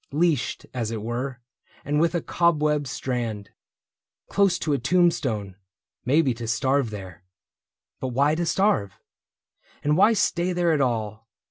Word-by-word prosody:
Leashed, 155 -3 0
as 120 -4 -2
it 110 -2 -4
were, 125 +3 -4 0.5
and 150 +1 +1
with 170 +2 +2
a 170 - -1
cobweb 150 -4 +1
strand. 120 -6 -4 0.8
Close 195 -3 +3
to 155 -3 -1
a 140 - +1
tombstone 130 - +1 0.3
— - - -54
maybe 140 -1 +3
to 115 0 -7
starve 130 +2 +1
there. 95 -4 -9 0.8
But 130 - -3
why 140 +4 +2
to 170 +1 -1
starve? 135 - +1 0.9
And 150 +1 +2
why 205 +6 +5
stay 180 -3 +1
there 175 -1 +2
at 150 - +1
all 115 -3 -2
140 Hz, 145 wpm, -24 LUFS, 115-165 Hz, 0.9 s, why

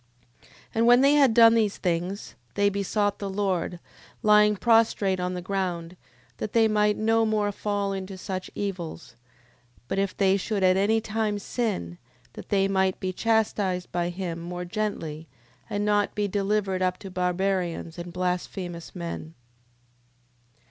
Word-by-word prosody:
10:4. - - -23 0.3
And 225 +1 +2
when 245 +1 +7
they 280 +1 +5
had 280 -4 +5
done 230 0 +7
these 215 -3 +1
things, 180 +3 -2 0.2
they 205 0 +3
besought 200 +1 -1
the 200 - -3
Lord, 190 -3 -1 0.4
lying 210 0 +5
prostrate 220 -4 +3
on 180 0 -2
the 180 - -5
ground, 180 -3 -3 0.4
that 210 - -5
they 225 -1 +5
might 210 -1 +2
no 225 +1 +2
more 215 -2 +1
fall 200 -1 -2
into 190 0 -6
such 185 0 -5
evils; 180 -5 -5 0.7
but 195 - -1
if 195 -1 -1
they 195 -1 +3
should 200 0 -2
at 185 0 +5
any 215 +4 +2
time 215 -1 -1
sin, 200 - -3 0.3
that - - -10
they 195 -1 +3
might 190 -1 +1
be 185 0 -3
chastised 205 -4 0
by 175 -1 -1
him 175 -2 -4
more 180 +1 -5
gently, 170 -5 -4 0.4
and 205 -1 -1
not 205 -1 +1
be 210 -1 0
delivered 200 -1 0
up 185 0 +1
to 195 - -9
barbarians 180 -2 -1
and 175 0 -6
blasphemous 180 -1 -4
men. 170 -2 -6
195 Hz, 155 wpm, -26 LUFS, 180-210 Hz, 0.7 s, when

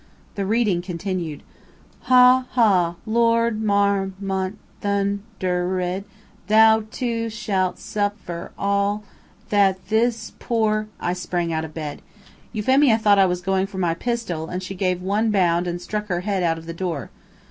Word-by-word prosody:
The 195 -2 -3
reading 210 -5 +2
continued. 175 -3 -4 0.7
"Ha, 255 0 +6
ha! 185 -8 +3
Lord 230 0 +2
Mar 200 -2 +2
mont 190 0 -2 0.2
thun 200 0 0 0.2
der 180 0 0
ed 180 +2 -2 0.4
thou 220 0 +5
too 230 -1 -2
shalt 195 -4 -1
suf 205 -1 -1
fer 170 0 -6
all 200 +1 0 0.5
that 195 -2 +2
this 225 0 +1
poor 215 -2 0
" - - -33
I - - +1
sprang 175 -2 -2
out 160 0 -1
of 155 - -11
bed. 150 -3 -5 0.5
Euphemia 250 +2 +3
thought 205 -2 +4
I 190 - +6
was 180 0 -2
going 190 +1 0
for 195 -1 -9
my 175 -3 +1
pistol, 180 -5 -3
and 180 +1 -4
she 185 - -5
gave 180 -1 -1
one 210 +4 +1
bound 180 -4 +2
and 175 0 -3
stuck 210 +4 -4
her 175 -3 -1
head 195 -1 -1
out 165 -2 +1
of 165 - -10
the 165 - -6
door. 165 -7 -4
195 Hz, 160 wpm, -22 LUFS, 180-220 Hz, 0.7 s, Ha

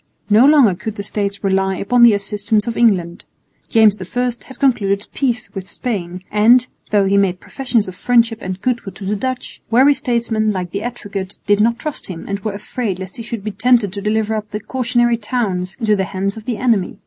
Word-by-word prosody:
No 225 +6 +7
longer 285 -9 +6
could 215 +4 -6
the 200 - -5
States 200 0 -2
rely 190 0 +1
upon 240 +7 +1
the 235 -3 +8
assistance 205 +1 0
of 235 -1 -3
England. 180 -7 +1 0.5
James 215 -3 +4
I 245 +7 -2 0.2
had 265 - -12
concluded 205 -7 +1
peace 245 -5 -1
with 190 -2 -7
Spain; 185 -7 -4
and, 230 +4 +5 0.2
though 205 -2 +3
he 195 +1 +2
made 190 -2 +1
professions 245 -4 -1
of 185 - -6
friendship 230 +2 +2
and 185 0 -5
goodwill 235 -6 -2
to 195 - -8
the 205 +2 0
Dutch, 255 +4 -5
wary 265 +5 +5
statesmen, 230 -4 0
like 180 -3 -4
the 200 - -3
Advocate, 205 -5 -6
did 205 0 +3
not 230 +2 +2
trust 300 +3 -5
him, 175 -4 -7
and 200 0 -3
were 205 +1 -4
afraid 210 0 -4
lest 185 0 -7
he - - -6
should 230 -2 -6
be 215 - -3
tempted 230 -3 +2
to 200 - -4
deliver 215 +1 0
up 215 -1 -4
the 210 - -4
cautionary 240 0 +1
towns 200 -5 -2
into 215 -3 +2
the 190 -1 -1
hands 195 +1 -3
of 220 -1 -10
the 240 -4 -2
enemy. 225 -5 0
210 Hz, 210 wpm, -18 LUFS, 195-235 Hz, 0.5 s, the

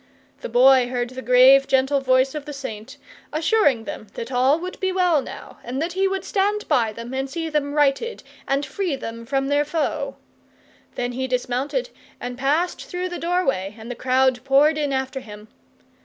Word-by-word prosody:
The - - -6
Boy 255 +1 +5
heard 245 -1 -3
the 260 0 -7
grave 260 +2 +6
gentle 270 +1 +2
voice 260 0 +2
of 300 -2 -6
the 295 - -7
Saint, 260 -1 -7 0.3
assuring 310 - +2
them 215 - -7
that 235 +2 -6
all 260 +4 +3
would 365 +2 -7
be 380 0 0
well 360 -5 +2
now, - - -10
and 250 +3 -4
that 335 +3 -2
he 385 +1 +2
would 385 0 -3
stand 415 +1 0
by 230 -3 +2
them 230 +3 -8
and 270 +1 -2
see 325 +2 -4
them 290 -2 -1
righted 295 +11 +1 0.2
and 275 +1 0
free 370 -7 -2
them 230 -2 -7
from 270 0 0
their 285 +1 +2
foe; 300 +1 -2 0.8
then 245 0 -2
he 260 +2 -3
dismounted 255 - -2 0.3
and 245 0 -5
passed 295 +7 0
through 360 0 -4
the 355 - -5
doorway 270 - -1
and 225 +2 -8
the - - -5
crowd 255 0 +1
poured 280 +3 +4
in 290 -2 -1
after 265 0 -2
him. 210 -3 -12
270 Hz, 185 wpm, -22 LUFS, 250-310 Hz, 0.8 s, grave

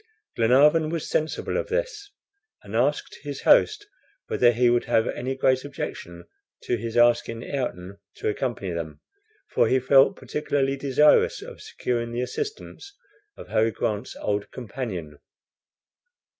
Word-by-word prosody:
Glenarvan 145 +7 +4
was 165 -1 -3
sensible 155 - -1
of - - -2
this, 455 -3 -3 0.5
and - - -8
asked - - 0
his - - -7
host 410 - +4 0.4
whether 120 -1 +3
he 120 +1 +2
would 120 0 +2
have 110 - +2
any 130 +2 -3
great 130 -1 +2
objection 85 -11 -7 0.4
to 120 - 0
his 115 +1 -4
asking 120 -1 +3
Ayrton 100 -8 -5 0.2
to - - -4
accompany 105 -4 -2
them, 80 -3 -5 0.5
for - - +3
he 130 - +3
felt 135 +1 +5
particularly 135 0 -1
desirous 140 +2 +3
of - - -11
securing 120 -1 -3
the 120 - -2
assistance 405 - -6 0.4
of - - -11
Harry 110 +1 +2
Grant's 110 +1 -3
old 100 0 -2
companion. 100 - -6
125 Hz, 135 wpm, -25 LUFS, 115-145 Hz, 0.5 s, felt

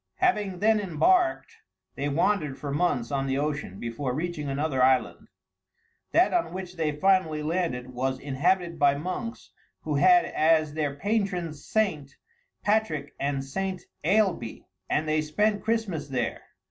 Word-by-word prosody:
Having 205 - 0
then 220 0 +4
embarked, 340 - +1 0.4
they 145 +1 -2
wandered 155 -1 +1
for 145 - -5
months 145 -6 0
on 135 -1 -1
the 135 0 0
ocean, 145 -9 -3
before 125 +2 -3
reaching 155 -2 -3
another 135 -1 -1
island. 130 0 +2 0.8
That 355 - +4
on 345 - 0
which 185 -1 -6
they 160 -3 0
finally 160 -1 +2
landed 150 -7 -2
was 130 +1 -1
inhabited 170 +6 0
by 140 -1 +4
monks 185 - -5 0.3
who - - -3
had 360 -1 +6
as 155 -1 +2
their 150 -3 -2
patrons 180 -4 -2
St. 160 -11 -1 0.5
Patrick 185 -10 0
and 140 -1 -1
St. 185 +6 -3 0.2
Ailbée, 190 - +1 0.2
and 155 +1 0
they 155 0 +2
spent 205 +7 0
Christmas 215 -9 -1
there. 125 -4 -2
155 Hz, 140 wpm, -27 LUFS, 140-195 Hz, 0.8 s, had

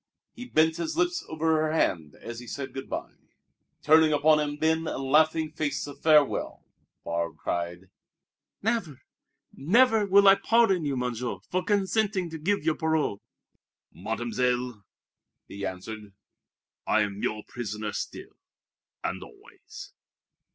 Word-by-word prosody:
He 245 - -9
bent 160 -6 +2
his 170 - -3
lips 350 +1 +1
over 160 0 +1
her 155 0 0
hand 80 - 0
as 115 0 -7
he 125 - -11
said 140 +3 -6
good 135 0 -7
by. - - -4 0.7
Turning 155 +1 +6
upon 150 +1 +4
him 145 -1 -2
then 160 +1 +1
a - - -3
laughing 155 +3 +2
face 150 -2 -2
of 145 -1 -11
farewell, 150 -3 +2 0.4
Barbe 85 0 -3
cried: 90 +2 -4 0.8
"Never, 200 - -1 0.5
never 220 - +3
will 200 +1 +6
I 195 - +10
pardon 210 -8 +3
you, 140 -2 -1
Monsieur, 125 -1 -3
for 185 0 0
consenting 200 -3 0
to 160 - -6
give 195 +1 0
your 160 -1 +1
parole!" 160 -10 0 0.7
"Mademoiselle," 125 -1 -2 0.6
he 100 0 -8
answered, 100 +2 -8 0.7
"I 110 - +3
am 100 0 -3
your 105 0 -2
prisoner 105 -3 -5
still, - - -6 0.7
and - - -3
always." - - -13
150 Hz, 135 wpm, -27 LUFS, 120-165 Hz, 0.8 s, I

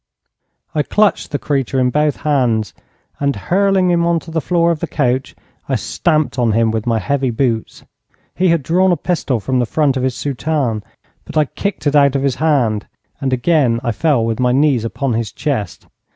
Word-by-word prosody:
I 150 - +1
clutched 210 +7 +1
the 145 - -1
creature 135 -2 -1
in 125 -1 +2
both 150 +1 +1
hands, 120 - +1 0.5
and, 140 -1 0
hurling 190 - +2
him 170 -1 +2
on 170 -1 +2
to 165 - -11
the 160 0 -1
floor 170 +1 +2
of 165 - -2
the - - -3
coach, 130 +2 -1 0.3
I - - +1
stamped 155 -5 0
on 115 -3 +2
him 115 0 +2
with 110 +1 -3
my 115 -1 +2
heavy 130 +6 0
boots. 115 -2 -2 0.5
He 185 - +1
had 170 -4 +2
drawn 180 +6 +2
a 175 - +2
pistol 145 -7 -1
from 130 +5 -1
the 120 - 0
front 140 0 +1
of - - -1
his 130 -1 -1
soutane, 140 -5 -2 0.4
but - - -6
I 155 - +4
kicked 200 +7 -4
it 145 0 +2
out 140 -1 +4
of 135 - 0
his 135 -3 0
hand, 125 -10 +1 0.3
and 135 -1 -1
again 130 -2 +2
I 120 - 0
fell 125 +1 +1
with 115 0 -2
my 125 -1 +2
knees 135 -3 +2
upon 125 +2 -2
his 115 -2 -2
chest. 115 - -3
135 Hz, 200 wpm, -17 LUFS, 120-155 Hz, 0.5 s, I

